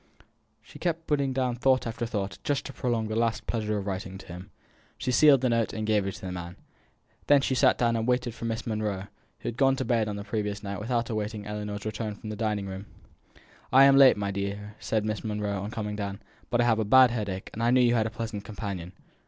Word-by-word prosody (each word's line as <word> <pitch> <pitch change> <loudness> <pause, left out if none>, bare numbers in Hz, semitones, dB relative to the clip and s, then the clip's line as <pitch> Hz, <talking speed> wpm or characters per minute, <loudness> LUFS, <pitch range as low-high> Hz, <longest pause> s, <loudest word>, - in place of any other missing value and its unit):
She - - -14
kept 165 -2 -1
putting 140 -3 +1
down 130 -2 -1
thought 130 +1 +3
after 115 0 -3
thought, 100 -4 -3
just 145 -1 -1
to 135 - -7
prolong 120 -4 -1
the 110 - -3
last 115 0 0
pleasure 110 -2 -1
of 100 - -4
writing 95 -1 -4
to 95 - -12
him. 90 +3 -9 0.5
She 125 - -2
sealed 140 0 +6
the 130 - +2
note, 115 -1 +1
and 110 -1 -3
gave 105 -2 +2
it 95 - -3
to - - -11
the 95 - -5
man. 85 -1 -6 0.7
Then 145 -1 +6
she 135 - 0
sat 130 0 +4
down 115 -1 +2
and 115 0 -1
waited 125 -1 +1
for 115 - -7
Miss 115 -1 -3
Monro, 105 -3 -3 0.3
who - - -2
had 120 - -7
gone 135 -1 +4
to 130 - -3
bed 115 -3 +1
on 105 - -3
the 100 - -5
previous 105 -1 -3
night 100 0 -4
without 115 +2 -1
awaiting 105 -1 -3
Ellinor's 105 0 -5
return 110 0 -3
from 110 +1 -8
the - - -4
dining 105 -2 -1
room. 95 +1 -7 0.8
"I 135 +1 +8
am 135 0 +7
late, 135 -4 +7
my 100 -1 -2
dear," 100 +1 -4
said 110 -1 -1
Miss 110 0 -2
Monro, 105 -2 -2
on 100 - -4
coming 105 -2 -4
down, 100 -1 -4 0.3
"but 120 - +1
I - - +5
have 115 -2 +3
a - - +2
bad 130 +3 +6
headache, 100 -5 -4
and 115 - -5
I 115 - +3
knew 125 +1 +5
you 120 -1 +4
had 110 -2 +2
a - - -3
pleasant 110 -2 -5
companion." 100 -5 -6
110 Hz, 245 wpm, -27 LUFS, 100-120 Hz, 0.8 s, I